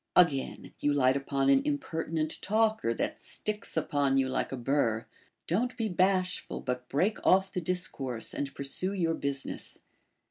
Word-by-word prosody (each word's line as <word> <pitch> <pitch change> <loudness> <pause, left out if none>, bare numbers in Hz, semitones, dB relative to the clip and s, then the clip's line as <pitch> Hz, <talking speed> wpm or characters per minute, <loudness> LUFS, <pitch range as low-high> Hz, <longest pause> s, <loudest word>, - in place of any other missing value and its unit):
Again, 150 -7 +2
you 145 - +2
light 130 -2 +4
upon 135 0 0
an 135 0 +5
impertinent 155 +2 -2
talker, 215 - +2
that 115 - -2
sticks 210 -5 -1
upon 145 -3 +1
you 135 -1 +3
like 130 - -1
a 135 - -3
burr; 120 -3 +1 0.4
don't 245 +8 0
be 225 -2 -1
bashful, 185 0 +1
but 125 0 -4
break 185 +10 0
off 190 +1 +4
the 180 - -2
discourse, 145 -9 -2
and 140 0 -4
pursue 140 +8 0
your 170 -4 +1
business. 140 -3 -4
145 Hz, 150 wpm, -30 LUFS, 135-185 Hz, 0.4 s, an